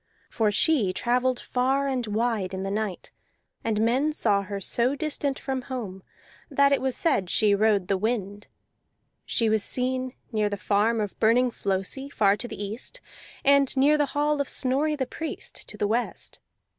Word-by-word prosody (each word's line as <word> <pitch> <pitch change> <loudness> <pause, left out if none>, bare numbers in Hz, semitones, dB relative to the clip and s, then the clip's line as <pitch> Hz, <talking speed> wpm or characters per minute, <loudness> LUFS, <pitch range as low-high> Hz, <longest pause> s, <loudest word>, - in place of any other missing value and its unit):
For 220 -2 +1
she 210 - +2
travelled 250 +2 +1
far 265 +2 0
and 255 -4 -1
wide 215 -3 -1
in 190 - -4
the 195 - -3
night, 210 -3 -3 0.5
and 220 -2 0
men 270 +6 +1
saw 205 -8 +2
her 200 0 -5
so 240 +7 +1
distant 285 -2 -1
from 265 -1 -3
home 210 -8 -5 0.5
that 280 -1 +3
it 280 - +2
was 265 -1 0
said 240 - +1
she 210 +3 +3
rode 200 -2 +2
the 195 -1 0
wind; 205 -2 -2 0.8
she 230 - +1
was 220 -1 +2
seen 255 0 -1 0.2
near 215 -2 +1
the 205 - -3
farm 210 +4 +1
of 205 -2 -4
Burning 245 +3 +4
Flosi, 200 +8 -3
far 200 -7 +3
to 240 - -5
the - - -8
east, 205 +4 -5 0.5
and 275 -1 +4
near 285 +3 +5
the 295 -1 +2
hall 295 0 +2
of 280 - -3
Snorri 280 +4 +1
the 270 -3 -1
Priest, 320 +5 -6
to 210 - -8
the 205 - 0
west. 235 +3 -2
235 Hz, 175 wpm, -26 LUFS, 205-270 Hz, 0.8 s, near